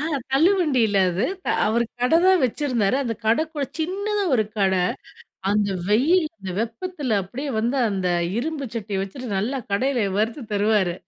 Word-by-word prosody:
அ - - -3 0.3
தள்ளுவண்டில 275 - +3
அது 190 +7 -1 0.4
அவரு 235 +2 +2 0.2
கடை 250 +7 +4
தான் 375 -5 +5
வச்சிருந்தாரு. 250 -3 0
அந்த 230 -1 -2
கடை 235 +9 +3
கூட 290 -3 -2
சின்னதா 400 +5 -1
ஒரு 220 -3 +2
கடை. 190 -2 +2 0.7
அந்த 205 0 +2 0.2
வெயில் 310 - +3
அந்த 190 - -7
வெப்பத்துல 245 - -2
அப்படியே 265 +10 -5
வந்து 240 +5 0
அந்த 190 -3 -1 0.3
இரும்பு 290 0 -3
சட்டி 205 -3 -3
வச்சுட்டு 245 +6 -7
நல்லா 240 +8 -1
கடையில 245 0 +1
வறுத்து 225 +5 -1
தருவாரு. 205 -4 +2
240 Hz, 145 wpm, -23 LUFS, 210-295 Hz, 0.7 s, தான்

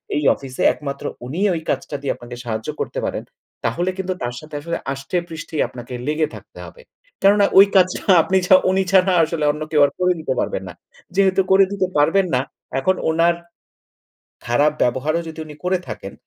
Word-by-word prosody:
এই 150 - 0
অফিসে 130 -2 -8
একমাত্র 140 -2 -6 0.2
উনিই 180 +11 0
ওই 160 - -3
কাজটা 145 - -2
দিয়ে 140 - -1
আপনাকে 120 0 -10
সাহায্য 110 -2 -4
করতে - - -3
পারেন, - - -3 0.4
তাহলে 175 +11 0
কিন্তু 185 -1 -2
তার 120 0 -3
সাথে 155 -1 -11
আসলে 170 +2 -3 0.2
আষ্টেপৃষ্ঠেই 160 +2 -4
আপনাকে 125 0 -10
লেগে 155 +1 +1
থাকতে - - -13
হবে। 485 - -13 0.4
কেননা 200 +1 +5
ওই 195 - +10
কাজটা 185 -1 +3 0.2
আপনি 190 - +1
ছা 185 - +8
উনি 190 0 +2
ছাড়া 190 -1 +4
আসলে 160 -1 -2
অন্য 150 +1 -8
কেউ 150 -2 +4
আর 140 - -2
করে 180 0 +3
দিতে 145 -4 -2
পারবে - - -1
না। 90 - -8 0.4
যেহেতু 195 -1 +3
করে 195 0 +6
দিতে 190 -2 0
পারবেন 175 +6 +3
না, 125 - +2 0.4
এখন 185 +7 +2
ওনার 165 +1 +3 1.1
খারাপ 145 +6 +3
ব্যবহারও 145 +7 +1
যদি 160 - -9
উনি 150 - -10
করে 185 0 +1
থাকেন, 105 -2 -7
160 Hz, 180 wpm, -20 LUFS, 140-185 Hz, 1.1 s, ওই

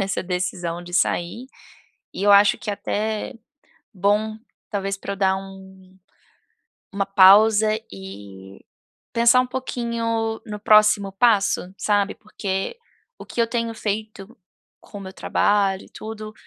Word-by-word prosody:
nessa 195 0 -2
decisão 180 -2 -3
de 175 0 -9
sair, 190 +6 0 0.7
e 185 - -5
eu 205 0 +5
acho 200 0 +6
que 210 - -5
até 215 +1 -3 0.6
bom 205 +3 0 0.3
talvez 195 -1 -2
para 200 - -5
eu 200 - -5
dar 190 -1 +2
um 190 -1 -12 1.0
uma 195 0 -1
pausa 205 +2 +6 0.2
e 95 0 -11 0.5
pensar 235 +2 +5
um 255 - -4
pouquinho 230 -3 -3
no 210 -1 -7
próximo 210 -1 +4
passo, 200 -4 +2
sabe? 205 -1 0
Porque 200 - -4 0.4
o - - -10
que 235 - -2
eu 230 - +1
tenho 230 -1 -2
feito 215 0 -5 0.4
com 205 - -12
o - - -9
meu 190 -1 -9
trabalho 195 -2 +1
e - - -20
tudo, 215 -1 -8
205 Hz, 135 wpm, -22 LUFS, 190-220 Hz, 1.0 s, acho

